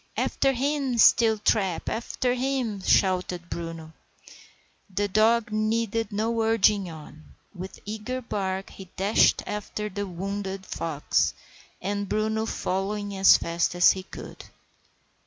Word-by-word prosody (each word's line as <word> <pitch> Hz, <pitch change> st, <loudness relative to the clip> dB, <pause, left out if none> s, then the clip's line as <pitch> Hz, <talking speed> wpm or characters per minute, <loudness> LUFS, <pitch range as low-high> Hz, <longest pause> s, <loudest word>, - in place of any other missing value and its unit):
"After 270 Hz, -, +1 dB
him, 270 Hz, -1 st, -1 dB
Steeltrap, 215 Hz, -6 st, +3 dB
after 245 Hz, +2 st, -1 dB
him!" 250 Hz, -5 st, -1 dB
shouted 180 Hz, -2 st, +1 dB
Bruno. 165 Hz, -1 st, -6 dB, 1.0 s
The 205 Hz, +2 st, -1 dB
dog 215 Hz, +2 st, +3 dB
needed 225 Hz, +1 st, 0 dB
no 225 Hz, +3 st, 0 dB
urging 210 Hz, -4 st, +3 dB
on. 155 Hz, -1 st, -12 dB, 0.2 s
With 190 Hz, 0 st, -8 dB
eager 220 Hz, +5 st, -4 dB
bark 195 Hz, -5 st, -3 dB
he 190 Hz, -, -10 dB
dashed 200 Hz, +3 st, +3 dB
after 210 Hz, 0 st, -4 dB
the 205 Hz, +1 st, -4 dB
wounded 195 Hz, +1 st, -5 dB
fox, 155 Hz, -5 st, -1 dB, 0.4 s
Bruno 215 Hz, +2 st, -1 dB
following 200 Hz, +1 st, -2 dB
as 190 Hz, 0 st, +7 dB
fast 170 Hz, +1 st, -1 dB
as 175 Hz, -, +7 dB
he 190 Hz, -, -4 dB
could. 185 Hz, -, -10 dB
205 Hz, 115 wpm, -26 LUFS, 190-225 Hz, 1.0 s, as